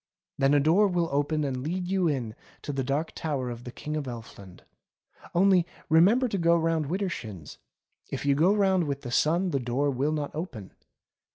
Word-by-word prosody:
Then 135 +1 +4
a - - +5
door 170 +9 +4
will 175 -3 0
open 145 +2 0
and 130 -3 -2
let 180 +6 -3
you 185 -1 +1
in 125 -8 -2 0.3
to 145 - -4
the 135 -1 -1
Dark 140 +5 -1
Tower 135 -6 -3
of 120 0 -9
the 125 - -6
King 150 +4 -6
of 150 -3 -3
Elfland. 110 -6 -10 0.7
Only 185 0 +5 0.3
remember 200 +11 +5
to 200 -4 -2
go 170 0 +4
round 165 -2 0
wider 190 +5 -1
shins. 105 - -7 0.5
If - - -5
you 140 - +4
go 160 +7 +4
round 190 -4 +2
with 140 -1 -4
the 120 - -6
sun 170 +8 +2
the 140 - 0
door 130 +4 0
will 135 +3 0
not 150 -2 -3
open. 140 - -6
150 Hz, 195 wpm, -27 LUFS, 135-175 Hz, 0.7 s, a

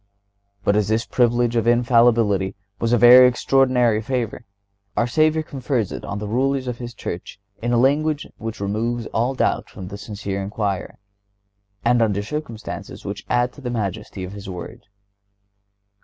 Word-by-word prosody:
But 100 - +2
as 105 -2 +2
this 110 +1 +1
privilege 120 -1 +2
of 115 0 +1
Infallibility 115 -5 +3 0.2
was 115 - 0
a 120 - +5
very 125 +2 +9
extraordinary 125 -3 +2
favor, 120 -1 -3 0.5
our 120 - +3
Savior 155 +5 +2
confers 130 -7 -2
it - - -6
on 100 - -4
the 105 0 -4
rulers 130 +4 0
of 125 -1 -4
His 120 -1 -7
Church 90 +3 -6 0.2
in 120 +1 -1
language 145 +5 +2
which 115 +1 -5
removes 110 +4 -2
all 120 +4 +1
doubt - - 0
from 90 -1 -9
the 100 0 -8
sincere 100 -2 -4
inquirer, 100 -1 -3 0.9
and 120 0 +4
under 100 -3 +1
circumstances 120 -3 -6
which 100 0 -6
add 120 0 +1
to 145 - -13
the 125 - -4
majesty 100 -4 -4
of 90 +2 -7
His 100 -1 -8
word. 90 +1 -8
115 Hz, 155 wpm, -22 LUFS, 105-125 Hz, 0.9 s, very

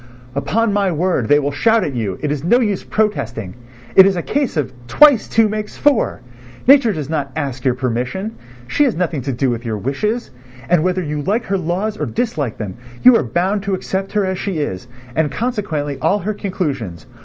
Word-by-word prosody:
"Upon 200 - 0
my 200 -2 +2
word, 165 -7 0
they 145 - +5
will 145 -1 0
shout 225 +10 +3
at 145 - -3
you, 110 -6 -2
it 150 - 0
is 145 -1 -3
no 235 +9 +4
use 210 -6 0
protesting: 120 - -2 0.4
it 190 0 +9
is 195 - +1
a 175 - -2
case 280 - -1
of 135 -3 -1
twice 275 - +6
two 225 -1 +3
makes 210 0 -4
four! 290 -5 +2 0.4
Nature 265 -4 +6
does 155 -7 -4
not 145 -3 -2
ask 135 -5 -3
your 130 -2 +2
permission, 125 - -3 0.3
she 295 - +1
has 255 - 0
nothing 165 -4 -1
to 135 - -3
do 130 +1 0
with 120 0 -4
your 110 -3 -3
wishes, 210 - -2 0.4
and 175 -3 +4
whether 185 0 0
you 150 -1 -3
like 205 +9 0
her 195 - 0
laws 185 +6 -2
or - - -2
dislike 155 - -2
them, 100 -4 -6 0.3
you 250 -1 +9
are - - +4
bound 180 - 0
to 195 0 -1
accept 190 +1 -4
her 205 -2 +2
as 190 0 -2
she 195 -5 -3
is, 120 -9 -3 0.3
and 155 -2 +1
consequently 160 - -2
all 165 +6 +3
her 210 +2 -3
conclusions. 140 - -4
175 Hz, 205 wpm, -18 LUFS, 135-210 Hz, 0.4 s, it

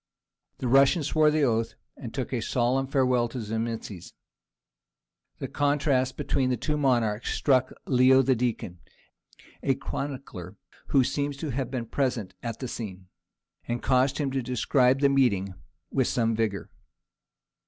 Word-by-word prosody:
The 130 - -3
Russian 135 +5 +4
swore 155 +1 +3
the 150 0 +1
oath 115 -3 0 0.2
and 120 -5 -8
took 130 +1 -4
a 120 - -1
solemn 130 +3 0
farewell 130 -3 +2
of 115 - -8
Zimisces. 110 -5 -4 1.2
The - - -5
contrast 140 -3 +1
between 130 -1 0
the 125 - 0
two 150 +6 -2
monarchs 120 -6 +1
struck 130 -2 +2
Leo 130 +1 +5
the 130 - +3
Deacon, 115 -7 -2 0.8
a - - +1
chronicler 125 -9 -6 0.3
who 135 -2 +4
seems 145 +2 -2
to 150 0 -4
have 130 -1 -2
been 125 -3 -3
present 120 -5 -2
at 115 -2 -4
the 130 - -5
scene, 95 -6 -7 0.6
and 120 0 -3
caused 130 +1 +2
him 140 -3 -1
to 135 0 -1
describe 125 +2 +2
the 140 - +6
meeting 100 -9 +2 0.4
with - - +1
some 115 -2 +1
vigour. 110 -3 -2
125 Hz, 145 wpm, -27 LUFS, 115-135 Hz, 1.2 s, the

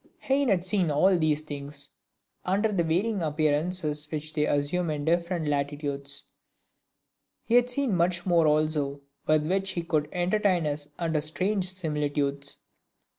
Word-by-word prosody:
Heine 275 +1 +1
had 185 -4 +2
seen 185 -2 +1
all 180 +6 +4
these 155 -2 +1
things, 145 -1 -6 0.5
under 200 +4 +1
the 195 -4 +1
varying 190 +6 0
appearances 150 0 0
which 155 0 -4
they 150 -1 +1
assume 155 +5 0
in 150 -1 -2
different 170 0 0
latitudes; 140 -1 -2 1.1
he 230 - -3
had 245 0 +5
seen 250 -4 0
much 175 0 +1
more 170 -3 +4
also 150 -2 +1 0.3
with 155 -1 +3
which 195 +2 0
he 170 - -2
would 155 -3 0
entertain 180 -1 +1
us 145 0 -2
under 165 -3 0
strange 185 +5 0
similitudes. 145 -4 -2
160 Hz, 140 wpm, -27 LUFS, 150-185 Hz, 1.1 s, had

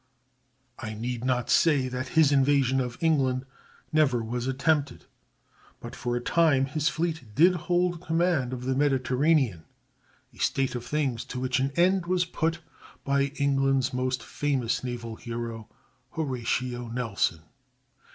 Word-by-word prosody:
I 110 -4 -5
need 120 +2 -4
not 125 -2 0
say 145 -6 +4
that 130 0 -4
his 155 -3 +6
invasion 135 -1 +3
of 125 -1 -4
England 135 -5 +1 0.5
never 135 -7 +3
was 120 +2 -3
even 130 0 -1
attempted; 145 0 0 0.7
but 120 +1 -9
for 120 -1 -2
a - - 0
time 145 0 +3
his 150 +2 0
fleet 160 -2 -2
did 175 +5 +6
hold 175 0 0
command 165 -6 +1
of 125 -1 -5
the 130 - +1
Mediterranean—a 135 - -1
state 135 -2 0
of 120 -1 -4
things 130 -3 -1
to 125 - -6
which 130 0 0
an 135 +1 +1
end 180 +1 +3
was 180 0 +1
put 165 -1 -2 0.4
by 140 0 +2
England's 135 -2 +1
most 125 -1 -1
famous 135 -6 -1
naval 115 -3 -5
hero, 115 -1 -6 0.4
Horatio 125 -4 -2
Nelson. 115 -8 -1
130 Hz, 140 wpm, -27 LUFS, 125-155 Hz, 0.7 s, his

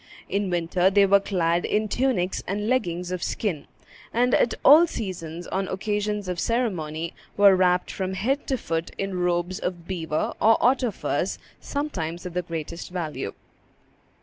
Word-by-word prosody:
In 200 -1 -1
winter 175 +1 +2
they 200 +1 +5
were 200 +1 +5
clad 175 -3 0
in 215 +1 0
tunics 210 -6 0
and 205 +2 -2
leggins 180 -8 0
of 180 -1 -3
skin, 175 -10 -2 0.4
and 245 +2 +2
at 235 - +3
all 315 +5 +9
seasons, 175 - -5
on 190 +2 -2
occasions 210 +1 -2
of 180 -1 -3
ceremony, 170 -10 -1 0.2
were 200 -1 +7
wrapped 180 -1 +2
from 190 0 -3
head 260 +9 -1
to 265 - 0
foot 165 -6 -3
in 195 -2 -3
robes 175 +1 0
of 175 -2 -4
beaver 160 -4 -2
or 225 +1 +6
otter 250 0 +3
furs, 200 - -2 0.2
sometimes 175 - -4
of 180 - -5
the 180 - 0
greatest 165 -1 -6
value. 170 -4 -4
185 Hz, 155 wpm, -25 LUFS, 175-210 Hz, 0.4 s, all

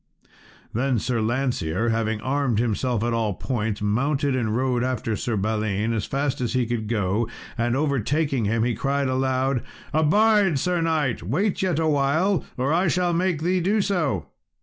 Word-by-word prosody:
Then 130 +2 +1
Sir 115 +1 -1
Lancear, 115 -5 0
having 110 -1 -1
armed 135 -3 0
himself 120 0 0
at 120 0 0
all 110 -4 0
points, 110 -3 -2
mounted, 135 +6 +1
and 115 -3 0
rode 125 -1 +1
after 125 -3 -1
Sir 110 +1 -2
Balin, 110 +1 0
as 110 -3 -1
fast 140 -1 -1
as 120 -1 -1
he 125 -2 +1
could 115 -2 -3
go, 105 0 0 0.3
and 120 +1 0
overtaking 140 -2 0
him, 110 +2 +1
he 120 0 +1
cried 140 +4 0
aloud, 130 0 0 0.3
"Abide, 195 +2 +4
Sir 175 +4 0
knight! 155 -7 0
wait 180 - 0
yet 185 -5 +1
awhile, 160 +3 +2
or 130 +4 +1
I 175 +3 +2
shall 175 +1 +1
make 170 -2 0
thee 180 +2 +2
do 205 +5 +2
so." 160 - 0
130 Hz, 165 wpm, -24 LUFS, 115-155 Hz, 0.3 s, Abide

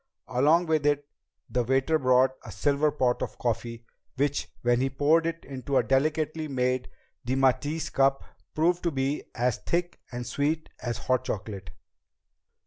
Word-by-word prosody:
Along 150 +8 +4
with 160 -2 +1
it, 145 -1 +1 0.4
the 125 - 0
waiter 135 +6 +2
brought 130 0 +4
a 110 - -9
silver 140 +9 +2
pot 125 -4 0
of - - -4
coffee, 115 0 -3 0.3
which, 145 +1 -1
when 120 0 +3
he 135 - +1
poured 155 +5 +3
it 165 0 -4
into 135 0 -2
a - - +4
delicately 155 +3 0
made 125 -2 -1 0.3
demitasse 135 +5 +1
cup, 135 0 +3 0.3
proved 170 +3 +2
to 170 - +1
be 140 0 -1
as 125 -2 +1
thick 175 +1 -2
and 120 0 -5
sweet 145 +6 -1
as 120 -1 -2
hot 130 -1 0
chocolate. 100 -3 -5
135 Hz, 150 wpm, -27 LUFS, 125-155 Hz, 0.4 s, Along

